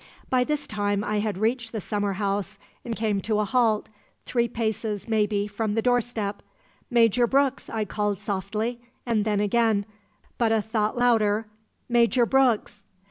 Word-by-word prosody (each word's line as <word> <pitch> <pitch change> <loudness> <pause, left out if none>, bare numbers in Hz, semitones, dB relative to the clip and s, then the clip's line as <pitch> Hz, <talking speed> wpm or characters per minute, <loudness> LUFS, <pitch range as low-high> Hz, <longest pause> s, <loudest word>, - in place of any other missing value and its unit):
"By 255 -1 +4
this 300 +2 -2
time 205 -1 -1
I 210 0 -1
had 210 -2 -2
reached 230 +2 0
the 220 - -3
summer 205 0 -2
house 200 +1 -2 0.3
and 235 -2 -4
come 215 -3 0
to 215 +2 0
a 210 - +1
halt, 225 -2 +2 0.4
three 235 -1 +1
paces, 220 -2 -3
maybe, 210 -2 +1
from 210 +1 -2
the 225 - +2
doorstep. 240 -4 0 0.5
'Major 240 -1 +4
Brooks!' 275 +1 +1
I 220 -1 -2
called 205 -1 -1
softly, 215 +4 -3 0.2
and 225 -4 +1
then 210 -2 +1
again, 210 0 +2 0.5
but 230 -2 +3
a 225 - +3
thought 215 +1 -1
louder, 225 -3 +3 0.4
'Major 240 0 +3
Brooks!' 240 -6 +1
220 Hz, 155 wpm, -25 LUFS, 205-235 Hz, 0.5 s, By